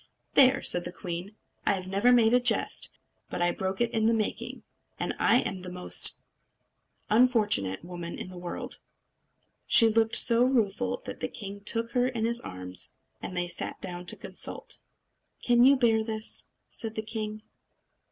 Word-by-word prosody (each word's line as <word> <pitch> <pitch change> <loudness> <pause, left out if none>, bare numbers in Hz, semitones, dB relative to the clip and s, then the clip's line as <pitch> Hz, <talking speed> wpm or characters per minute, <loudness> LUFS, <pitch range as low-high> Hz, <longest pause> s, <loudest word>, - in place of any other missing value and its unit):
"There!" 265 0 +5
said 175 - +2
the - - -6
queen, 180 +2 -7 0.3
"I 200 - +1
never 200 +6 +2
made 235 -2 +4
a 250 - +6
jest, 245 -2 +1 0.4
but - - -5
I 175 0 +2
broke 190 +2 -4
it 240 - +1
in 220 -1 +1
the 230 - +3
making. 215 -2 -4 0.4
I - - +2
am 190 - -4
the 180 0 -8
most 180 0 +3 0.9
unfortunate 210 - +2
woman 175 -1 -7
in - - -7
the 180 - -11
world!" 175 0 -6 0.9
She 230 - +7
looked 225 0 +2
so 235 0 +6
rueful 245 -1 0
that - - -7
the - - -2
king 200 -2 -8
took 230 +2 0
her 245 0 +1
in 235 -3 -2
his 235 +1 0
arms; 90 0 -3 0.3
and 180 - -6
they 175 0 -1
sat 170 - -4
down 180 -1 -5
to - - +2
consult. - - -3 0.6
"Can 240 -1 +3
you 270 +3 +7
bear 225 -4 +2
this?" 220 -1 0 0.2
said 225 -2 -5
the 220 - -3
king. 215 -1 -5
220 Hz, 165 wpm, -28 LUFS, 180-235 Hz, 0.9 s, She